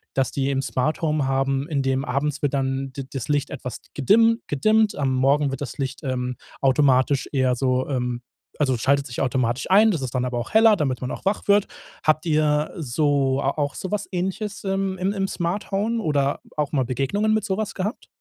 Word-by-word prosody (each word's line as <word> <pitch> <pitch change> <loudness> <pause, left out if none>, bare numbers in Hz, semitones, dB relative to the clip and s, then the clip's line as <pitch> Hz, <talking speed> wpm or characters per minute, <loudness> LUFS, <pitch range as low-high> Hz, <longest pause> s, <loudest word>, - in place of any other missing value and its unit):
dass 135 -1 +1
die 135 0 -1
'n 135 0 0
Smart-Home 150 +2 0
haben, 135 +1 0
in 140 -3 0
dem 135 0 0
abends 140 +3 -2
wird 145 -1 0
dann 135 0 -1
d 135 -1 -6
das 135 -4 -4
Licht 145 -1 0
etwas 125 -3 -6
gedimm 225 - +4
gedimmt. 215 +9 +2
Am 135 -2 0
Morgen 140 +2 +2
wird 135 - -5
das 125 - -5
Licht, 135 +2 -4
ähm, 125 -1 -2 0.3
automatisch 135 0 +3
eher 130 -3 +2
so 130 0 0
ähm, 125 -2 -2 0.4
also 135 -4 +2
schaltet 140 +3 +1
sich 120 - -4
automatisch 130 +4 0
ein. 215 +3 +7
Das 160 -7 -2
ist 130 -1 -4
dann 125 - +1
aber 125 -1 -2
auch 120 - -5
heller, 220 -1 +6
damit 135 -9 -1
man 125 - -4
auch - - -7
wach 200 +2 -1
wird. 205 0 +4 0.4
Habt 155 +1 +2
ihr 150 -1 +1
so 140 -1 +1
auch 140 0 -1
so 185 - -5
was 210 -1 -1
Ähnliches 195 +4 -3
im 195 0 -1
im 190 +3 0
im 195 -1 -1
Smart-Home 200 +5 -1
oder 145 -4 0 0.2
auch 150 0 -1
mal 135 -3 +2
Begegnungen 140 - 0
mit 215 -2 0
so 190 - -1
was 215 -2 -3
gehabt? 205 +7 -4
140 Hz, 200 wpm, -23 LUFS, 130-190 Hz, 0.4 s, ein